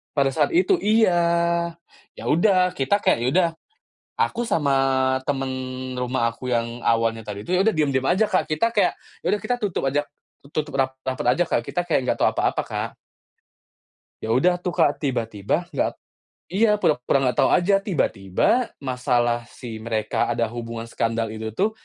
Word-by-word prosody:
Pada 140 Hz, -2 st, +3 dB
saat 135 Hz, -, 0 dB
itu 365 Hz, +2 st, +4 dB
iya. 170 Hz, -, +2 dB, 0.4 s
Ya -, -, -6 dB
udah, 180 Hz, +3 st, +4 dB
kita 200 Hz, +10 st, +1 dB
kayak, -, -, +3 dB
ya -, -, +1 dB
udah, 180 Hz, -1 st, +4 dB, 0.7 s
aku 240 Hz, -, 0 dB
sama 165 Hz, -12 st, +1 dB, 0.6 s
temen 135 Hz, -1 st, -1 dB, 0.4 s
rumah 125 Hz, -1 st, -1 dB
aku 125 Hz, +2 st, -7 dB
yang 120 Hz, 0 st, -1 dB
awalnya 115 Hz, 0 st, +1 dB
tadi 105 Hz, -1 st, -7 dB
itu, 180 Hz, -, -2 dB
ya 180 Hz, -, +4 dB
udah 210 Hz, -, +4 dB
diem-diem 140 Hz, -4 st, +1 dB
aja, 190 Hz, +5 st, +3 dB
Kak. 185 Hz, -, 0 dB
Kita 230 Hz, +10 st, +1 dB
kayak, 210 Hz, -, +3 dB, 0.3 s
ya -, -, -20 dB
udah 210 Hz, -, +1 dB
kita 230 Hz, +3 st, 0 dB
tutup 190 Hz, -9 st, -1 dB
aja 140 Hz, +2 st, +1 dB, 0.5 s
tutup 150 Hz, 0 st, -3 dB
rap 130 Hz, -1 st, 0 dB
rapet 130 Hz, -1 st, -3 dB
aja, 175 Hz, -, +4 dB
Kak. -, -, 0 dB
Kita 175 Hz, -1 st, -3 dB
kayak 160 Hz, -5 st, +1 dB
nggak -, -, +1 dB
tahu -, -, +3 dB
apa-apa, -, -, 0 dB
Kak. -, -, -3 dB, 1.3 s
Ya 110 Hz, -, -5 dB
udah 175 Hz, +7 st, +3 dB
tuh, 180 Hz, -, -3 dB
Kak. 160 Hz, -4 st, +2 dB
Tiba-tiba 120 Hz, -, -1 dB
nggak -, -, 0 dB, 0.6 s
iya, 210 Hz, +3 st, +3 dB
pura-pura 135 Hz, -6 st, +2 dB
nggak 125 Hz, -1 st, 0 dB
tahu -, -, +4 dB
aja. 190 Hz, +3 st, +4 dB
Tiba-tiba 160 Hz, -, 0 dB
masalah 125 Hz, -3 st, 0 dB
si 115 Hz, -3 st, -9 dB
mereka 110 Hz, -1 st, -1 dB
ada 115 Hz, -1 st, 0 dB
hubungan 115 Hz, -1 st, -6 dB
skandal 115 Hz, -1 st, -1 dB
itu 110 Hz, 0 st, -6 dB
tuh 210 Hz, -, +1 dB
140 Hz, 170 wpm, -23 LUFS, 120-180 Hz, 1.3 s, itu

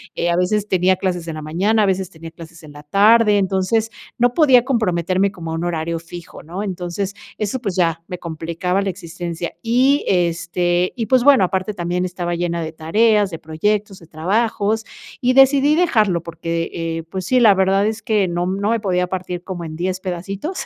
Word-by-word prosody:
eh, 170 Hz, -, 0 dB
a -, -, +1 dB
veces, 205 Hz, +4 st, 0 dB
tenía 185 Hz, 0 st, +2 dB
clases 180 Hz, -3 st, -3 dB
en 160 Hz, -, -4 dB
la 155 Hz, -, -6 dB
mañana, 200 Hz, +8 st, +1 dB
a -, -, +3 dB
veces 190 Hz, -1 st, -1 dB
tenía 165 Hz, -2 st, -11 dB
clases 165 Hz, -1 st, -13 dB
en 150 Hz, -, -12 dB
la 145 Hz, 0 st, -12 dB
tarde. 210 Hz, +5 st, +4 dB
Entonces, 195 Hz, +4 st, 0 dB, 0.3 s
no 245 Hz, 0 st, +2 dB
podía 265 Hz, -7 st, +5 dB
comprometerme 190 Hz, -, +1 dB
como 165 Hz, -4 st, -7 dB
a -, -, -2 dB
un 165 Hz, -, -3 dB
horario 165 Hz, -1 st, -2 dB
fijo, 175 Hz, 0 st, -10 dB
¿no? 180 Hz, +6 st, -6 dB
Entonces, 185 Hz, +1 st, -4 dB, 0.2 s
eso, 215 Hz, +5 st, -2 dB
pues, 200 Hz, -6 st, -3 dB
ya 165 Hz, -2 st, +1 dB
me 180 Hz, -1 st, -5 dB
complicaba 170 Hz, +3 st, -2 dB
la 195 Hz, -, -1 dB
existencia. 175 Hz, -2 st, -5 dB
Y, 255 Hz, +5 st, +2 dB
este, 175 Hz, 0 st, 0 dB
y, 230 Hz, -3 st, -2 dB
pues, 255 Hz, -2 st, +3 dB
bueno, 275 Hz, -9 st, +6 dB
aparte 190 Hz, +3 st, -1 dB
también 180 Hz, 0 st, -2 dB
estaba 175 Hz, -1 st, -3 dB
llena 170 Hz, -1 st, -2 dB
de 160 Hz, -1 st, -4 dB
tareas, 205 Hz, +6 st, +2 dB
de 165 Hz, -, -7 dB
proyectos, 195 Hz, +5 st, -2 dB
de 165 Hz, -, -16 dB
trabajos, 210 Hz, +6 st, -1 dB, 0.4 s
y 255 Hz, +1 st, +2 dB
decidí 275 Hz, +2 st, +5 dB
dejarlo 215 Hz, -, +2 dB
porque, 165 Hz, 0 st, -3 dB
eh, 165 Hz, -1 st, -3 dB
pues, 185 Hz, -2 st, -4 dB
sí, 255 Hz, +3 st, +3 dB
la 215 Hz, -4 st, +7 dB
verdad 195 Hz, +1 st, +2 dB
es 220 Hz, +1 st, -2 dB
que 210 Hz, -3 st, +1 dB
no 175 Hz, 0 st, -1 dB
m 190 Hz, +2 st, -2 dB
no 205 Hz, -, +1 dB
me 230 Hz, -, +1 dB
podía 180 Hz, -3 st, 0 dB
partir 180 Hz, -1 st, -5 dB
como 180 Hz, -3 st, -6 dB
en 155 Hz, 0 st, -7 dB
10 185 Hz, +2 st, -2 dB
pedacitos, 195 Hz, -, -5 dB
185 Hz, 200 wpm, -19 LUFS, 170-210 Hz, 0.4 s, la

